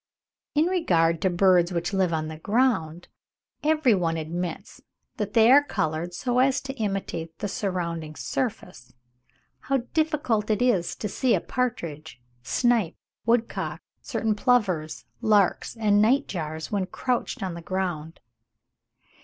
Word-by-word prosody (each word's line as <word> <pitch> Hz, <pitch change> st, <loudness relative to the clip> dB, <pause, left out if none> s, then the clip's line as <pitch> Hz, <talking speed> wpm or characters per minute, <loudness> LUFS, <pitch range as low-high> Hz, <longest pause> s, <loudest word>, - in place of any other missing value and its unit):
In 305 Hz, +2 st, +4 dB
regard 170 Hz, -, +2 dB
to 190 Hz, -, +2 dB
birds 180 Hz, -1 st, +4 dB
which 175 Hz, +2 st, -2 dB
live 190 Hz, -3 st, +2 dB
on 155 Hz, -1 st, -1 dB
the 155 Hz, 0 st, -8 dB
ground, 200 Hz, -6 st, 0 dB, 0.6 s
every 305 Hz, -5 st, +3 dB
one 165 Hz, -4 st, 0 dB
admits 165 Hz, +2 st, -5 dB, 0.4 s
that 210 Hz, -1 st, -3 dB
they 225 Hz, +1 st, +6 dB
are 285 Hz, +2 st, +8 dB
coloured 165 Hz, -, -2 dB
so 245 Hz, +5 st, 0 dB
as 265 Hz, +1 st, +3 dB
to 270 Hz, 0 st, -6 dB
imitate 195 Hz, -6 st, -3 dB
the -, -, -3 dB
surrounding 170 Hz, -6 st, -3 dB
surface. 180 Hz, -, -4 dB, 0.6 s
How 270 Hz, -1 st, 0 dB
difficult 295 Hz, -9 st, 0 dB
it 215 Hz, -1 st, +2 dB
is 230 Hz, -9 st, +1 dB
to 210 Hz, -, -4 dB
see 240 Hz, +5 st, +1 dB
a -, -, +1 dB
partridge, 160 Hz, -, -4 dB, 0.2 s
snipe, 220 Hz, -, +1 dB, 0.3 s
woodcock, 230 Hz, 0 st, 0 dB, 0.2 s
certain 225 Hz, -5 st, -1 dB
plovers, 205 Hz, -9 st, +1 dB, 0.2 s
larks, 210 Hz, +1 st, +2 dB
and 210 Hz, -2 st, +3 dB
night 265 Hz, +6 st, +3 dB
jars 160 Hz, -3 st, -5 dB
when 195 Hz, -3 st, 0 dB
crouched 245 Hz, +2 st, -2 dB
on 185 Hz, -2 st, -3 dB
ground. 175 Hz, -3 st, -3 dB
195 Hz, 135 wpm, -25 LUFS, 170-240 Hz, 0.6 s, are